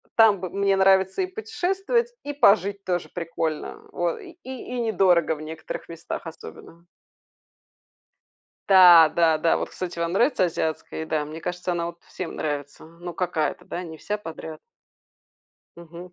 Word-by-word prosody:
там 220 -4 +6
бы 185 -2 -5
мне 195 0 +1
нравится 190 - +3
и - - +1
путешествовать, 390 +4 -1
и 290 - -4
пожить 200 -5 +3
тоже 180 -2 -2
прикольно. 165 -2 -4
Вот, 175 -1 -2
и 345 -3 -13
и 260 -1 -7
и - - -2
недорого 185 -7 +3
в 150 - -11
некоторых 160 +1 -7
местах 165 0 -6
особенно. 165 +1 -12 1.8
Та, 175 -4 +9
да-да. 165 -1 +3
Вот, - - -4
кстати, 175 -2 -6
вам 170 0 -1
нравится 240 0 +3
азиатская 160 -2 -3
еда? 160 -1 -1
Мне 155 +2 -8
кажется, 180 +1 -3
она 170 -1 -1
вот 170 0 -8
всем 180 - -6
нравится. 145 0 -4
Ну 170 +2 -9
какая-то, 175 -3 -2
да? 175 - -5
Не 160 -3 -8
вся 210 +6 -4
подряд. 160 -4 -8 1.2
Мгм, 170 +1 -11
175 Hz, 150 wpm, -24 LUFS, 165-200 Hz, 1.8 s, Та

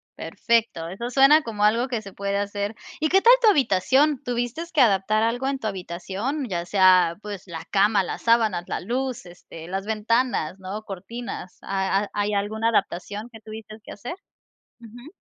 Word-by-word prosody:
perfecto, 225 -8 -1
eso 235 +7 -5
suena 275 +4 +6
como 215 -4 -3
algo 230 +5 +3
que 235 -4 -3
se 195 -2 -11
puede 200 0 -2
hacer. 205 +1 -3 0.2
¿Y 310 0 +1
qué 385 +2 +4
tal 475 +4 +8
tu 450 - +6
habitación? 270 - +3
¿Tuviste 245 +7 -3
que 305 -5 +3
adaptar 215 0 +3
algo 245 +3 0
en 275 -1 -1
tu 220 - -3
habitación? 195 - -4
Ya 175 -2 -2
sea, 185 -3 +4
pues, 205 -3 -8
la 165 -2 -7
cama, 200 0 +3
las - - -6
sábanas, 220 -6 +2
la - - -3
luz, 250 +2 -3
este, 175 -2 -12
las 195 +2 -4
ventanas, 220 -4 0
¿no? 195 +3 -6
Cortinas. 205 0 -7
¿Ha 195 +1 -1
hay 205 0 -1
alguna 215 +3 0
adaptación 210 +1 -2
que 225 - -12
tuviste 215 0 -10
que - - -11
hacer? 240 - -7 0.7
Ujú. 240 - -13
215 Hz, 175 wpm, -24 LUFS, 195-245 Hz, 0.7 s, tal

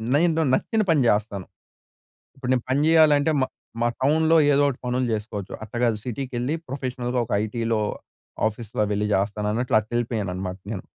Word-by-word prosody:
నేను 165 +1 +3
నచ్చిన 220 - +1
పని 160 -4 +4
జెస్తాను. 105 -3 0 0.9
ఇప్పుడు 135 -2 -5
నేను 125 -2 +1
పని 135 - +2
జెయాలంటే 155 -2 +5
మా 130 - +2 0.3
మా 120 - +3
టౌన్‌లో 160 +4 +4 0.2
ఏదోటి 140 -2 +2
పనులు 125 +1 0
జెసుకోవచ్చు. 105 -2 -4
అట్ట 110 - -10
గాదు 115 -3 +2
సిటీ‌కెళ్ళి 125 +2 -3
ప్రొఫెషనల్‌గా 125 -2 -3
ఒక - - -14
ఐటీ‌లో, 115 +1 -1 0.7
ఆఫీస్‌లో 110 +1 -3
వెళ్లి 105 +1 0
జెస్తాను 100 +2 0
అన్నట్లు 120 0 +1
అట్ల 110 0 -5
ఎళ్ళిపోయాను 110 -5 -1
అన్నమాట 95 0 -5
నేను. 95 - -5
120 Hz, 155 wpm, -24 LUFS, 105-140 Hz, 0.9 s, జెయాలంటే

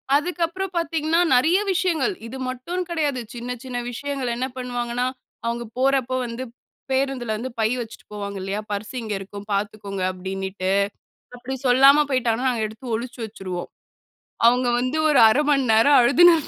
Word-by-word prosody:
அதுக்கு 345 +4 -1
அப்புறம் 375 +3 -5
பாத்தீங்கனா, 325 0 +1 0.2
நெறைய 320 +9 +4
விஷயங்கள். 370 0 +1
இது 255 +3 -7
மட்டும்னு 340 +9 -3
கிடையாது. 295 -6 0
சின்ன 240 +1 -5
சின்ன 255 -2 -5
விஷயங்கள் 270 0 -3
என்ன 255 +2 -2
பண்ணுவாங்கனா, 245 -1 -2 0.4
அவங்க 235 +1 -1 0.2
போறப்போ 260 -1 +2
வந்து 235 +2 -5 0.5
பேருந்துல 265 -4 0
வந்து 250 +4 -4
பை 220 - +3
வெச்சுட்டு 230 -2 -8
போவாங்க 200 -1 -5
இல்லையா, 195 +2 -3
"பர்ஸ் 205 +5 -4
இங்க 220 -2 -4
இருக்கும் 200 +1 -9
பாத்துக்கோங்க" 200 -1 -3
அப்டினுட்டு. 190 0 -3 0.7
அப்படி 250 +2 -5
சொல்லாம 275 +4 +7
போய்ட்டா, 250 -3 +2 0.2
நாங்க 240 -3 0
எடுத்து 225 +3 -7
ஒழிச்சு 240 +3 -5
வெச்சுருவோம். 190 -5 -6 0.8
அவங்க 245 +1 +4
வந்து 255 +5 -1
ஒரு 295 - +4
1/2 255 +7 +3
மணி 275 -2 +3
நேரம் 255 +6 +6
அழுதுன்னு 340 +8 +7
250 Hz, 150 wpm, -23 LUFS, 220-280 Hz, 0.8 s, சொல்லாம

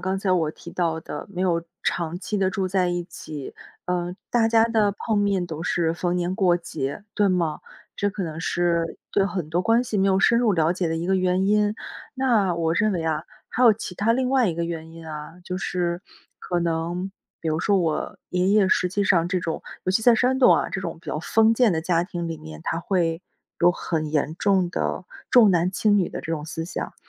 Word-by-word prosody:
刚 190 +1 -1
才 195 0 -1
我 165 -4 +2
提 170 - -12
到 165 -2 -1
的 150 - -7
没 180 -2 -5
有 170 -3 +1 0.2
长 170 0 -1
期 210 +2 -3
地 190 -1 +2
住 190 -1 -1
在 185 -1 +1
一 175 0 -2
起， 150 -5 -8 0.3
呃， 180 0 -1 0.2
大 235 -2 +3
家 225 -1 +5
的 220 -3 +2
碰 215 +1 -1
面 200 -3 +1
都 160 -1 -6
是 165 -2 +1
逢 175 +1 -1
年 180 +1 -1
过 180 -3 +3
节， 160 0 -5
对 205 -1 +3
吗？ 170 -4 0 0.4
这 205 - +1
可 200 0 -4
能 160 -2 -5
是 170 -1 0 0.2
对 195 -1 +3
很 180 -6 -4
多 170 +2 +1
关 230 +5 +3
系 225 -5 -2
没 195 - +3
有 190 0 +3
深 235 +4 +4
入 235 -3 +3
了 160 0 +2
解 180 -1 -1
的 165 - -1
一 165 +1 -3
个 190 +1 +2
原 185 0 +1
因。 210 +1 +2 0.4
那 235 -9 +2
我 165 -1 0
认 210 +2 +2
为 170 -3 -2
啊， 160 0 -1 0.2
还 250 - -1
有 235 - +8
其 195 -4 -7
它 215 +5 +2
另 255 +1 0
外 260 -6 +3
一 165 - -1
个 170 +1 -2
原 165 -1 -5
因 165 0 -11
啊， 150 0 -7
就 185 0 -4
是 175 -2 -2 0.4
可 175 -1 -2
能， 170 +3 -2 0.3
比 165 - -3
如 155 - 0
说 200 +3 +2
我 165 -4 -2
爷 180 +1 +1
爷 200 -2 +4
实 180 - +2
际 200 +3 0
上 170 -3 +3
这 185 0 0
种 165 -1 -3 0.2
尤 185 - +1
其 190 - +2
在 240 +1 +6
山 255 +3 +2
东 255 - +7
啊， - - 0
这 195 - -3
种 170 -3 -5
比 - - -23
较 - - -2
封 220 +7 +3
建 230 -3 +3
的 160 -1 -1
家 170 0 +2
庭 175 -2 -4
里 165 -1 -5
面， 80 0 -10
它 165 - -1
会， 170 -3 0 0.4
有 175 - +5
很 160 -3 -3
严 150 0 0
重 190 -3 +2
的， 185 - -2 0.3
重 235 -5 +7
男 175 0 +2
轻 205 +2 +2
女 180 - +1
的 - - -6
这 165 - -4
种 155 -2 -2
思 160 0 -4
想。 175 - -5
180 Hz, 250 characters per minute, -24 LUFS, 165-200 Hz, 0.4 s, 有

